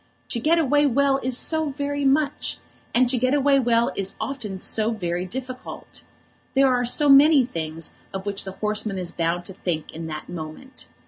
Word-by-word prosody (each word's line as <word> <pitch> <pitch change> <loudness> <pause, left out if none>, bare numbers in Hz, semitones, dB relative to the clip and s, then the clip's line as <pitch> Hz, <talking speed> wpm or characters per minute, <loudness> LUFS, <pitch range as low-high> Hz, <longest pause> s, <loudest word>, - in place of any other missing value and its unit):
To 235 - 0
get 315 +7 +3
away 290 -2 +3
well 275 +1 +2
is 255 -1 0
so 315 +1 0
very 285 0 -3
much! 285 +1 +1 0.3
And 250 +1 +4
to 250 0 +1
get 255 +3 +2
away 280 -1 +4
well 235 -2 +2
is 195 0 -2
often 235 -8 -4
so 215 +3 -1
very 180 -5 -2
difficult! 255 +4 -7 0.5
There 270 -1 +5
are 245 0 +1
so 295 +4 +3
many 280 0 +7
things 160 -7 -5 0.2
of 190 0 -6
which 200 -1 -1
the 190 - -7
horseman 210 -1 -1
is 180 -2 -3
bound 175 +1 -1
to 190 - -9
think 165 -4 -3
in 165 0 -7
that 155 -1 -6
moment. 170 - -9
245 Hz, 185 wpm, -23 LUFS, 190-275 Hz, 0.5 s, many